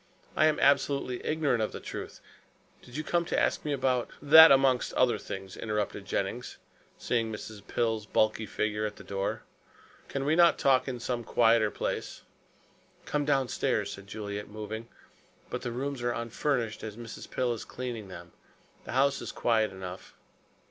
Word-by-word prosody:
I 155 - +5
am 155 - +1
absolutely 140 -2 +2
ignorant 150 -7 +1
of 110 - -1
the - - -5
truth. - - -7 0.6
Did 125 +3 -10
you 155 - -2
come 170 +2 +1
to - - 0
ask - - +1
me 150 - -2
about 130 -3 0
" - - -23
"That 160 0 +12
amongst 135 -2 +3
other 130 -1 +3
things," 95 -1 -7
interrupted 105 -2 -3
Jennings, 105 +6 -3 0.4
seeing 115 -2 -1
Mrs. 105 -1 -8
Pill's 110 -3 -1
bulky 110 0 +1
figure 105 +1 -1
at 105 - -8
the - - -12
door. 100 0 -3 0.6
"Can 140 -1 -3
we 155 +2 +3
not 170 0 +6
talk 130 -1 +3
in 125 -2 -3
some 120 0 -2
quieter 115 -1 +4
place?" - - -4 0.8
"Come 145 -1 -1
downstairs," 135 -4 0
said 100 0 -9
Juliet, 105 -1 -5
moving, 110 +2 -6 0.6
"but 125 - -3
the 125 -2 -4
rooms 135 +2 -3
are 120 0 0
unfurnished 120 0 -2
as 110 -1 -6
Mrs. 115 -1 -9
Pill 125 -2 0
is 115 - -6
cleaning 120 -5 -6
them. 85 -2 -10 0.5
The - - -6
house 140 +2 +2
is - - -5
quiet 110 -3 +1
enough." 95 -1 -9
120 Hz, 170 wpm, -29 LUFS, 105-135 Hz, 0.8 s, That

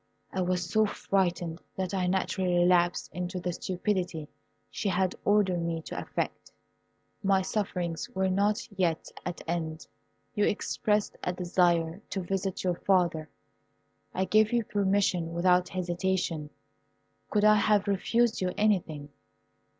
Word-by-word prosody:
I 190 - 0
was 180 -1 0
so 215 +4 +3
frightened 175 -4 -1
that 190 0 -3
I 185 -2 0
naturally 185 -1 0
relapsed 175 0 +3
into 180 +2 -3
the 180 0 -2
stupidity 180 -4 -2 0.4
she 205 - -2
had 185 0 +1
ordered 200 -4 +3
me 165 -1 -2
to - - -5
affect. - - -4 0.7
My 195 -1 +3
sufferings 180 -5 -2
were 190 0 0
not 200 +3 +1
yet 170 -4 0 0.2
at 180 - -5
an - - -14
end. 160 -2 -3 0.5
You 205 - +2
expressed 210 0 0
a 180 - -1
desire 175 -1 +1
to 195 - -2
visit 190 +1 -2
your 180 -2 0
father. 175 -5 +1 0.8
I 190 - 0
gave 215 +2 +4
you 240 -1 +2
permission 190 -5 +1
without 180 +1 +3
hesitation. 175 -3 -1 0.8
Could 210 -1 +1
I 215 0 +7
have 205 -1 +3
refused 225 +4 +1
you 180 -1 0
anything? 170 -9 0
185 Hz, 135 wpm, -29 LUFS, 175-200 Hz, 0.8 s, I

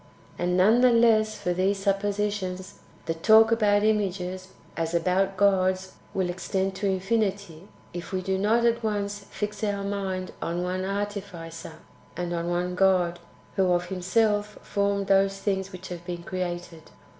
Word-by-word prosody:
And 180 +1 +1
none 215 +6 +5
the 250 -1 +6
less 220 -2 +4
[for 180 -3 -1
these 190 +3 +1
suppositions], 200 -1 -2 0.3
the 165 - -1
talk 220 +7 +5
about 210 -2 +3
images, 185 -3 -1 0.3
as 165 +1 -2
about 185 +3 +1
gods, 185 -1 +2 0.2
w^ill 190 -2 +1
extend 190 +2 -2
to 200 +1 -1
infinity, 195 -3 -1 0.3
if 175 0 -7
we 185 -1 -2
do 190 0 -1
not 225 +4 +2
at 235 0 +2
once 205 -1 -2
fix 210 0 -4
our 200 -1 -1
mind 195 -2 -3
on 170 +1 -2
one 185 +1 -2
Artificer, 195 -5 -5 0.4
and 175 -1 -2
on 170 0 -2
one 175 +1 -1
God, 180 -2 +2 0.4
wdio 185 -2 +4
of 175 0 -1
Him 190 -2 -4
self 210 +2 +1
formed 200 0 0
those 195 0 +3
things 195 -1 -2
which 185 -1 -9
have 175 -1 -7
been 175 -1 -6
created. 175 -3 -5
190 Hz, 155 wpm, -26 LUFS, 180-205 Hz, 0.4 s, the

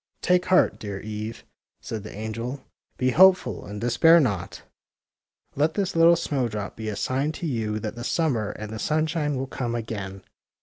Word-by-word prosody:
Take 180 0 +3
heart, 185 - +3
dear 100 -2 -5
Eve," 110 +2 -6 0.4
said 110 - -5
the 110 - -9
angel. 115 +5 -5 0.3
Be 130 0 +1
hopeful 185 +6 +4
and 105 0 -6
despair 160 +9 +5
not. 100 - -2 0.9
Let 150 +3 +1
this 195 -3 -1
little 165 +1 +6
snowdrop 120 -11 -2
be 110 -1 -5
a 105 - -3
sign 135 +8 -1
to 170 - -6
you 110 -7 -1
that - - -4
the 120 -1 -7
summer 125 -8 0
and 105 0 -7
the 110 - -5
simshine 155 0 0
will 130 +1 -2
come 120 -3 -3
again." 100 -4 -5
120 Hz, 170 wpm, -25 LUFS, 110-155 Hz, 0.9 s, little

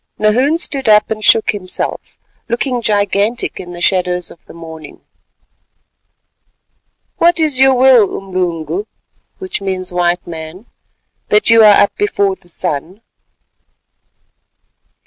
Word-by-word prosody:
Nahoon 250 +9 +2
stood 275 -7 -1
up 210 0 +4
and 215 -1 -4
shook 225 - +3
himself, 185 -3 -5 0.3
looking 245 +1 -2
gigantic 205 +1 0
in 175 -1 -9
the 175 - -9
shadows 180 -1 0
of 170 - -17
the - - -13
morning. 160 -2 -11 2.2
"What 345 0 +3
is 300 -5 0
your 265 0 +5
will, 250 -5 +4
Umlungu 185 - -4 1.1
(white 175 0 0
man), 165 +4 -9 0.6
that 210 +2 +2
you 230 -1 +6
are 210 -1 +6
up 205 - -2
before 200 - 0
the 180 - -19
sun?" 175 +4 -4
205 Hz, 110 wpm, -15 LUFS, 180-245 Hz, 2.2 s, you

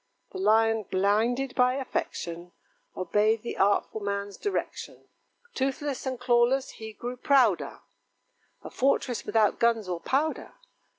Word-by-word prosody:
The 380 - -7
Lion, 225 - +3
blinded 225 +7 +1
by 250 0 +3
affection, 175 -9 -4 0.4
Obeyed 210 +4 +1
the 235 - -4
artful 200 +2 +1
man's 200 0 -3
direction; 410 - -4 0.5
Toothless 270 +1 -2
and 260 -2 -3
clawless, 250 +2 +2
he 220 0 -7
grew 245 +4 -6
prouder 250 -8 +2 0.8
(A - - -8
fortress 260 -2 0
without 220 -2 +2
guns 230 -3 +2
or 175 -2 -3
powder). 290 - -1
230 Hz, 120 wpm, -27 LUFS, 205-260 Hz, 0.8 s, Lion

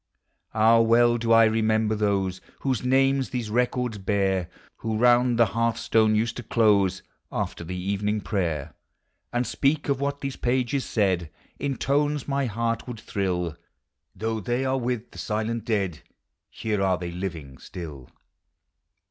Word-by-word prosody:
Ah! 110 +1 +5
well 120 +1 +4
do 115 0 0
I 115 0 +8
remember 110 0 +2
those 100 -3 0 0.2
Whose 130 -4 -1
names 135 +1 +2
these 120 -4 -3
records 125 -1 0
bear; 95 -2 0 0.3
Who 110 -1 -2
round 120 +1 +4
the 115 - +6
hearthstone 110 -1 +2
used 115 +2 0
to - - -4
close, 105 -6 +2 0.3
After - - -3
the 90 +2 -5
evening 100 +3 -1
prayer, 85 -8 -2 0.6
And 120 +1 0
speak 145 +4 0
of 140 -1 0
what 140 0 -2
these 135 -1 -4
pages 130 +2 0
said 95 -6 0 0.3
In 140 -1 -1
tones 145 0 0
my 140 -1 0
heart 115 +2 -2
would 120 -3 -6
thrill! 90 -6 -2 0.6
Though 110 0 -2
they 120 +5 -1
are 130 0 +1
with 120 -1 -3
the - - -11
silent 110 +1 -2
dead, 100 -8 -1 0.5
Here 105 -3 -2
are 95 -2 +2
(hey 90 -1 -4
living 85 -7 -6
still! 75 -8 -9
110 Hz, 150 wpm, -25 LUFS, 100-125 Hz, 0.6 s, I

